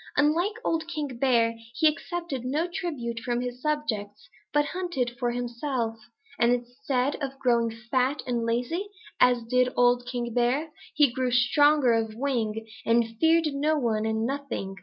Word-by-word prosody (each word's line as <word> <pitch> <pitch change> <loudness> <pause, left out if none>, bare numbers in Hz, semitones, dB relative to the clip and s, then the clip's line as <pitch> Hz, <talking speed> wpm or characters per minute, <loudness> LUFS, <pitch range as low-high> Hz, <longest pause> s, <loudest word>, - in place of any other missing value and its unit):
Unlike 335 +8 +2
old 325 -1 0
King 290 -7 -4
Bear, 230 -3 +2 0.2
he 315 - +1
accepted 330 -3 -2
no 290 +6 0
tribute 285 -10 -4
from 240 +1 -1
his 250 0 -5
subjects 220 -9 -3 0.2
but 295 0 +3
hunted 345 -10 -2
for 245 -2 +1
himself, 240 -1 -2 0.4
and 235 +1 +4
instead 250 +2 -1
of 270 -1 -4
growing 235 -3 +2
fat 250 +5 -1
and 240 -2 -1
lazy, 250 - -1 0.3
as 245 -1 +4
did 250 +2 +2
old 245 0 +3
King 240 -2 -3
Bear, 250 +6 +1 0.2
he 295 -4 +5
grew 255 -1 0
stronger 260 +2 +4
of 225 -1 -1
wing 225 -4 -2 0.2
and 230 0 +2
feared 320 -2 +3
no 300 +3 +1
one 220 -5 0
and 220 0 0
nothing. 270 -7 -4
250 Hz, 155 wpm, -27 LUFS, 235-295 Hz, 0.4 s, he